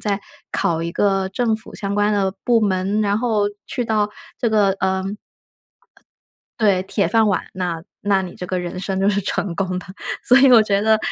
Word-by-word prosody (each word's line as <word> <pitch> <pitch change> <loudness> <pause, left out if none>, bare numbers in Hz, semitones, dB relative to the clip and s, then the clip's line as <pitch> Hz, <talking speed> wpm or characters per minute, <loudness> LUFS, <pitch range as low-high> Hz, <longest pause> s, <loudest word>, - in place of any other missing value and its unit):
再 205 -1 -1 0.3
考 165 -1 0
一 170 - -3
个 195 0 +1
政 225 +2 +1
府 220 - -8
相 200 0 -3
关 205 +1 +2
的 195 -2 +1
部 235 -2 +3
门， 195 0 0
然 205 -1 +1
后 220 -4 +1 0.2
去 245 - -2
到 215 -2 0 0.3
这 235 - 0
个 210 -2 +3
呃 190 0 0 1.6
对， 200 -4 +3
铁 195 +1 0
饭 225 -1 +3
碗， 200 - 0
那 180 -3 -3 0.2
那 200 -2 +2
你 185 -2 -6
这 - - -7
个 185 - -1
人 180 +1 -5
生 190 0 -2
就 195 - +3
是 205 0 +2
成 190 -2 -2
功 185 0 -2
的， 185 - -9 0.4
所 250 - +5
以 270 -1 +6
我 240 -3 +8
觉 200 -2 +1
得 220 +1 +3
200 Hz, 210 characters per minute, -20 LUFS, 190-215 Hz, 1.6 s, 我